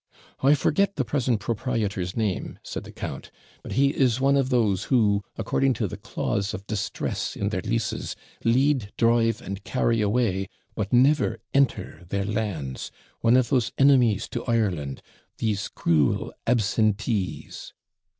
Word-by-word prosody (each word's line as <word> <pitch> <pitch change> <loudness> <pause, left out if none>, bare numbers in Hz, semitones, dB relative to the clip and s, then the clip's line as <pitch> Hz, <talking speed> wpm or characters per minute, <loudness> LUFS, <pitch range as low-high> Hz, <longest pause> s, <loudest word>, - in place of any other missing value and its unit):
'I 140 +3 +5
forget 200 +7 +1
the 135 - -1
present 120 -2 0
proprietor's 105 -5 -2
name,' 105 -5 -2
said - - -6
the - - -10
count; - - -6 0.3
'but - - -7
he 140 +2 +4
is 130 -3 +2
one 135 +1 +3
of 135 -2 +2
those 110 -7 +2
who, 105 -6 +3 0.2
according 135 -1 +1
to 110 - -1
THE - - -6
CLAUSE 100 0 -2
OF 100 - -9
DISTRESS 105 -2 -3
in 100 - -1
their 95 -4 -2
leases, 110 +1 -2 0.3
LEAD, 125 -2 +2
DRIVE, 115 -1 +2
AND 100 +1 -6
CARRY 115 -3 +1
AWAY, 100 -3 +1 0.2
but 105 -2 -3
never 135 +5 +4 0.2
ENTER 135 - +1
their 100 0 -1
lands; 100 - -3 0.3
one 115 +2 +4
of 130 -2 +2
those 125 -5 +1
enemies 125 -7 +4
to 120 - -4
Ireland 95 - -1 0.3
these 105 -2 -1
cruel 75 -5 +1
absentees!' 110 -3 0
115 Hz, 145 wpm, -25 LUFS, 100-125 Hz, 0.3 s, I